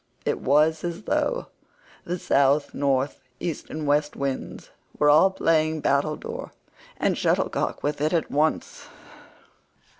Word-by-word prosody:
It - - 0
was 155 +3 +2
as 175 +3 -4
though - - 0 0.6
the 175 +1 -2
South, 140 -2 +2
North, 135 0 0 0.2
East, 165 -4 -4
and 155 0 -5
West 145 +1 +1
winds 140 -1 -4 0.3
were 150 0 +5
all 160 +6 +6
playing 160 -4 +1
battledore 145 +2 -1 0.5
and - - +1
shuttlecock - - 0
with 145 0 -2
it 155 +1 +1
at 165 -3 0
once. 155 +2 -1
150 Hz, 125 wpm, -25 LUFS, 140-160 Hz, 0.6 s, all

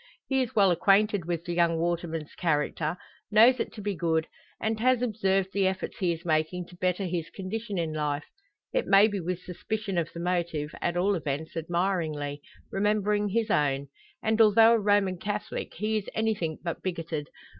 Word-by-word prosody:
He 265 -1 +1
is 245 -3 -3
well 200 -3 +5
acquainted 195 +1 +3
with 170 -1 -3
the 175 - -3
young 170 -1 +2
waterman's 165 -2 -2
character, 155 0 -1 0.3
knows 230 +4 +6
it - - -2
to 210 - -8
be 205 0 -1
good, 165 -2 0 0.3
and 220 0 -1
has 255 +1 +3
observed 195 -5 +1
the 195 -1 +2
efforts 190 0 -3
he 180 -3 +2
is 170 +1 -5
making 160 +2 0
to 180 - -13
better 180 +2 0
his 170 -2 -3
condition 205 +2 -5
in 165 -2 -1
life; 150 -1 -2 0.5
it - - 0
may 195 +2 +7
be 205 -2 -3
with 180 +1 -3
suspicion 195 +1 -3
of 165 -1 -3
the 170 - -8
motive, 170 -4 -1
at 175 0 0
all 195 +3 +2
events, 155 -3 -3
admiringly 165 -4 -1 0.3
remembering 210 +1 +1
his 220 +1 0
own. 140 -1 +1 0.3
And 220 +1 +3
although 225 +1 +7
a 230 - +3
Roman 205 -3 +2
Catholic, 210 +2 -4
he 215 +1 0
is 205 - -4
anything 210 -8 0
but 170 -2 -4
bigoted. 165 -5 -3
185 Hz, 180 wpm, -28 LUFS, 165-210 Hz, 0.5 s, may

